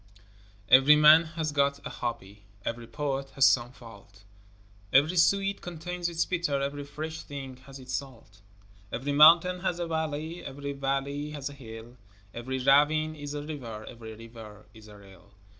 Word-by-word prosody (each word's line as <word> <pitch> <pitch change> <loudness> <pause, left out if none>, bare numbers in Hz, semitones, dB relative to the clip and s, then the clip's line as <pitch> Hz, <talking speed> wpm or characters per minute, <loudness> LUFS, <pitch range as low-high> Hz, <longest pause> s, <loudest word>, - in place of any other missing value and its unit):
Every 135 +4 +7
man 155 +2 +7
has 155 -2 -1
got 140 -1 +1
a - - -5
hobby, 105 -4 -6 0.2
Every 115 0 -4
poet 135 +3 -3
has 135 -1 +5
some 120 -2 +3
fault, 100 -5 -15 0.7
Every 150 +6 +4
sweet 195 +3 +2
contains 175 +1 -5
its 170 0 -1
bitter, 170 -6 -1
Every 140 +1 -3
fresh 155 +2 -6
thing 135 -3 -8
has 135 0 -10
its 130 -1 -9
salt. 115 -7 -7 0.5
Every 135 +5 -3
mountain 165 +5 +6
has 180 -1 -2
a 175 - -3
valley, 160 0 -4
Every 140 +1 -6
valley 140 +1 -2
has 145 0 -5
a - - -11
hill, 115 -2 -11 0.4
Every 130 +3 -4
ravine 150 +4 +3
is 145 -1 -7
a 145 - -4
river, 120 -8 -7
Every 110 -2 -10
river 110 -2 -12
is 110 -2 -15
a 105 -1 -13
rill. 100 0 -18
140 Hz, 160 wpm, -28 LUFS, 120-155 Hz, 0.7 s, Every